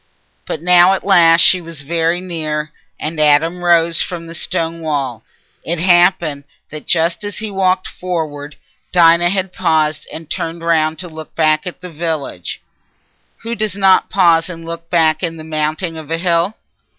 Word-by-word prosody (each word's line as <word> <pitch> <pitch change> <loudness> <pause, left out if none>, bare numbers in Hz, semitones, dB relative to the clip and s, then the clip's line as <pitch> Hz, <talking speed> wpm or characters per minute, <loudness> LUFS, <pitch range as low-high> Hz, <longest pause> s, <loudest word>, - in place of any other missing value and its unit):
But 155 - -5
now 180 +1 +6
at 190 - -3
last 170 -4 +5
she 185 - +5
was 165 -3 -8
very 165 +3 0
near, 155 -4 -4 0.3
and 155 +1 -4
Adam 160 +4 +2
rose 170 -1 +3
from 170 -2 -5
the 165 - -9
stone 165 0 -2
wall. 140 -7 -3 0.4
It 170 +2 -2
happened 175 -4 +2 0.3
that 155 0 -9
just 170 +2 +1
as 205 -1 -6
he 215 -1 -5
walked 185 -1 0
forward, 155 -5 -5 0.4
Dinah 170 0 +5
had 190 0 -2
paused 155 -3 0
and 160 0 -9
turned 165 0 -5
round 160 -1 +1
to 180 - -6
look 160 -1 -11
back 155 +1 +1
at 180 - -8
the 180 -1 -9
village—who 160 - -7
does 215 -4 -2
not 190 -1 +3
pause 170 -3 +3
and 165 -2 -8
look 165 0 -8
back 160 -3 +2
in 165 -2 -3
mounting 155 +2 -2
a 160 +1 -4
hill? 170 +3 0
165 Hz, 160 wpm, -16 LUFS, 155-180 Hz, 0.4 s, now